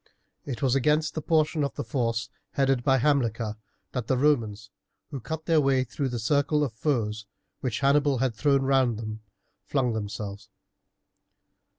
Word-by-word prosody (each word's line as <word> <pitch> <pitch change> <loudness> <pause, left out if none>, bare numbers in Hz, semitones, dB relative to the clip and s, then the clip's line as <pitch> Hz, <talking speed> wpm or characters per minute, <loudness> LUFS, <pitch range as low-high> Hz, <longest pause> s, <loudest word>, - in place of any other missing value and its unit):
It 140 0 -5
was 130 -2 +3
against 150 +3 +2
the 155 - -3
portion 155 0 +2
of 140 - -2
the - - -3
force 115 -4 -1 0.2
headed 135 -3 +2
by 135 0 +4
Hamilcar 115 -5 +1 0.3
that 125 -3 -3
the 130 - +2
Romans, 115 -8 +1 0.4
who 140 - -4
cut 160 +6 -5
their 165 -3 +4
way 135 -2 +3
through 130 +2 -3
the 120 - -3
circle 145 +6 +2
of 130 -6 -2
foes 110 -4 -1 0.3
which 125 -1 -3
Hannibal 140 0 +3
had 130 -1 0
thrown 140 +3 +2
round 130 -4 +2
them, 110 -1 -6 0.5
flung 130 -4 +1
themselves. 105 -1 -5
130 Hz, 160 wpm, -27 LUFS, 115-145 Hz, 0.5 s, by